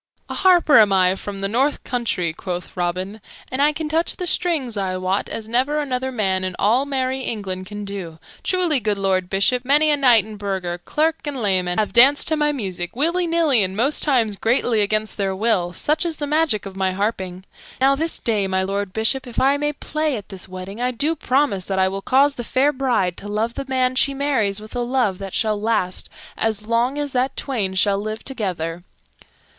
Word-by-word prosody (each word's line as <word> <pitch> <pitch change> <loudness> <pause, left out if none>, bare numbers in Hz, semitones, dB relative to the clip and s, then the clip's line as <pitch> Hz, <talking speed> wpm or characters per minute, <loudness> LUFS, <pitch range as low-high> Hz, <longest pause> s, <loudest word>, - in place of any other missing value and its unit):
"A - - -4
harper 350 -8 +5
am 210 -2 +5
I 185 -1 +4
from 200 +1 -7
the 195 - 0
north 265 +8 0
country," 210 -10 -1
quoth 180 +1 -6
Robin, 185 +4 -3 0.3
"and 260 +2 -1
I 295 +1 +4
can 310 +1 -4
touch 325 +2 0
the 360 - -4
strings, 315 -9 0
I 190 -2 -2
wot, 185 +2 -1
as 220 -1 -5
never 255 +6 +1
another 260 -3 -2
man 190 -6 0
in 185 -1 -3
all 245 +7 +2
merry 265 -1 -1
England 190 -7 -4
can 205 +1 -7
do. 190 -5 -6 0.2
Truly, 355 -6 +2
good 210 -3 -1
Lord 190 -2 0
Bishop, 240 +6 +1
many 295 +4 +3
a - - +4
knight 245 -7 +5
and 215 -1 -10
burgher, 190 -4 -3
clerk 315 +1 0
and 285 -3 -4
layman, 185 -4 0
have 215 -1 0
danced 265 +5 +6
to 315 - +2
my 295 -1 +1
music, 190 -10 -5
willy 340 +6 +1
nilly, 325 -8 +3
and 190 0 -1
most 275 +7 +2
times 230 -8 +1
greatly 230 0 +1
against 215 +1 0
their 195 -2 -1
will; 195 -4 +1
such 300 - +1
is 335 -3 -2
the 295 - -3
magic 300 -8 +1
of 195 -1 -8
my 190 -1 0
harping. 190 -2 -3 0.4
Now 270 +1 +4
this 320 +4 +1
day, 210 -4 0
my 190 0 0
Lord 195 0 -3
Bishop, 250 +4 0
if 240 - -4
I 275 +2 +3
may 295 +1 0
play 305 -1 -2
at 205 - -10
this 190 -2 -9
wedding, 185 +4 -8
I 250 - +1
do 285 +7 +1
promise 265 - 0
that 195 - -2
I 190 0 +3
will 195 +1 -4
cause 275 +6 +3
the 240 - -6
fair 275 +5 +1
bride 240 -10 0
to 205 - -9
love 215 +3 -1
the 275 - -5
man 255 -1 +1
she 275 +2 +2
marries 260 -8 0
with 215 +3 -11
a - - -1
love 240 -6 0
that 195 -1 -6
shall 215 -2 0
last 210 -5 -1 0.3
as 220 -1 -1
long 235 +5 0
as 290 -1 -2
that 255 +1 -1
twain 210 -9 -2
shall 195 +1 +2
live 215 +1 -5
together." 175 -9 -4
225 Hz, 210 wpm, -21 LUFS, 195-275 Hz, 0.4 s, danced